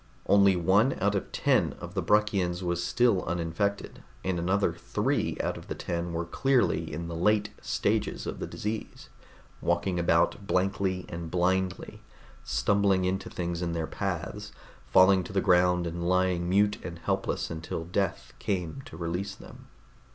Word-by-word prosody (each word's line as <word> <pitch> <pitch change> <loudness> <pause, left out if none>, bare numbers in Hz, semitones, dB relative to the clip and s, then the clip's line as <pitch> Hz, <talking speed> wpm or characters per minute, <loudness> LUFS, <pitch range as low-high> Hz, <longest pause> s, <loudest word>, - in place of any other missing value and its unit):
Only 100 -1 +5
one 95 +9 +3
out 100 +1 +2
of 100 - -3
ten - - +2
of 85 0 -8
the 95 - -1
Bruckians 95 -2 +1
was 85 -1 -1
still 115 +1 +2
uninfected, 85 +4 -2 0.2
and 95 -2 0
another 95 +1 +1
three 105 - -1
out - - -1
of - - -14
the - - -4
ten 85 0 -3
were 85 0 -2
clearly 135 +6 +1
in 85 +3 -4
the 85 - -5
late 105 +4 +2
stages - - -1
of - - -5
the - - -4
disease, 110 +1 -5 0.5
walking 85 +1 0
about 85 +3 +2
blankly 95 -1 0
and 85 -1 -6
blindly, 90 +1 -1 0.4
stumbling 95 +8 +2
into 95 +1 -2
things 85 -1 -3
in 85 -1 -1
their 80 -1 -1
paths, 90 +1 -4 0.4
falling 95 0 +6
to - - -9
the 100 - +2
ground 90 -2 +3
and 85 +1 -3
lying 90 -1 +1
mute 100 +2 +3
and 85 -1 -6
helpless 85 - -2
until 80 0 -5
death 95 +1 -2
came 95 +4 -2
to 80 - -10
release 90 +4 -3
them. - - -14
90 Hz, 160 wpm, -28 LUFS, 85-100 Hz, 0.5 s, falling